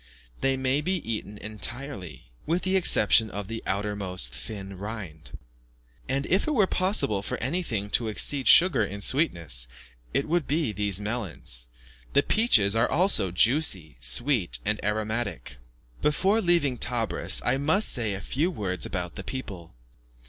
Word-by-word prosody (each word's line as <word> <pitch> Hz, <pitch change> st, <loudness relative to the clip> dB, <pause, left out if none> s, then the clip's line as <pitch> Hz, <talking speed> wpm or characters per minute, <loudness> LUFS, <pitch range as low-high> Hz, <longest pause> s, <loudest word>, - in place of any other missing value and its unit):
They 135 Hz, 0 st, +1 dB
may 130 Hz, +2 st, 0 dB
be 185 Hz, +5 st, -1 dB
eaten 105 Hz, -2 st, -4 dB
entirely, 110 Hz, -, -4 dB, 0.2 s
with 170 Hz, +3 st, 0 dB
the 190 Hz, 0 st, +1 dB
exception 110 Hz, -, +4 dB
of 100 Hz, -1 st, -6 dB
the 115 Hz, +1 st, -5 dB
outermost 95 Hz, -9 st, -2 dB
thin 100 Hz, -3 st, -7 dB
rind; 100 Hz, -8 st, -8 dB, 0.7 s
and, 135 Hz, +1 st, -1 dB
if 190 Hz, -, +1 dB
it 310 Hz, -, 0 dB
were 210 Hz, -5 st, +4 dB
possible 185 Hz, -, 0 dB
for -, -, -4 dB
anything 120 Hz, -, -3 dB
to 115 Hz, +1 st, +1 dB
exceed 130 Hz, +5 st, 0 dB
sugar 170 Hz, -10 st, +6 dB
in 100 Hz, 0 st, -5 dB
sweetness, 85 Hz, -, 0 dB, 0.4 s
it 140 Hz, +3 st, -1 dB
would 170 Hz, -1 st, 0 dB
be 150 Hz, -5 st, 0 dB
these 100 Hz, -1 st, +1 dB
melons. 100 Hz, -, -2 dB, 0.5 s
The 140 Hz, -, +4 dB
peaches 115 Hz, -, +3 dB
are 115 Hz, -, +2 dB
also 180 Hz, -, +2 dB
juicy, 90 Hz, -, +2 dB
sweet, 85 Hz, -, +2 dB
and -, -, -1 dB
aromatic. 105 Hz, -, -3 dB, 0.4 s
Before 190 Hz, +9 st, +2 dB
leaving 165 Hz, -, +2 dB
Tebris, 120 Hz, -2 st, +1 dB
I -, -, +2 dB
must 160 Hz, +10 st, +2 dB
say 110 Hz, -5 st, +1 dB
a 100 Hz, -, -6 dB
few 155 Hz, +7 st, -1 dB
words 95 Hz, -, -3 dB
about 90 Hz, -1 st, -4 dB
the 95 Hz, -, -7 dB
people. 95 Hz, -, -7 dB
110 Hz, 150 wpm, -26 LUFS, 100-145 Hz, 0.7 s, sugar